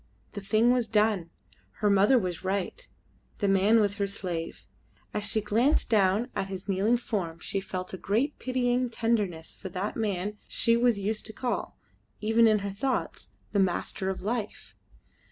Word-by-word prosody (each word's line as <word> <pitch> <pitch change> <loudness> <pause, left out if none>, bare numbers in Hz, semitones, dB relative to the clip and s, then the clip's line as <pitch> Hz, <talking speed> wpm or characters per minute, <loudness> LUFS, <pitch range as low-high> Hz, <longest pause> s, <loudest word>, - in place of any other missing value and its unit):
The 205 - -5
thing 215 +4 +3
was 245 -2 +1
done. 210 -5 +1 0.4
Her 210 - 0
mother 200 +7 +5
was 180 -6 -2
right. 200 - -3 0.5
The 205 - 0
man 195 +4 +4
was 205 -1 +1
her 200 -1 0
slave. 175 -4 -5 0.5
As 210 - -1
she 215 +1 +2
glanced 230 +9 +2
down 210 +3 +3
at 195 - -1
his 190 0 -7
kneeling 200 +5 +2
form 185 -8 -3
she 195 - -3
felt 185 -1 -5
a - - -4
great 240 +9 0
pitying 250 -1 0
tenderness 210 -9 -1
for 190 - -8
that 185 +3 -3
man 205 -1 -2
she 230 - +2
was 235 -2 +3
used 210 +2 -1
to 220 - -8
call 245 +2 -3 0.4
even 225 +2 +4
in 215 -1 +4
her 200 - -2
thoughts 255 +7 -3 0.2
the 205 - +1
master 190 0 0
of 190 -1 -4
life. 220 0 -4
210 Hz, 170 wpm, -28 LUFS, 195-230 Hz, 0.5 s, mother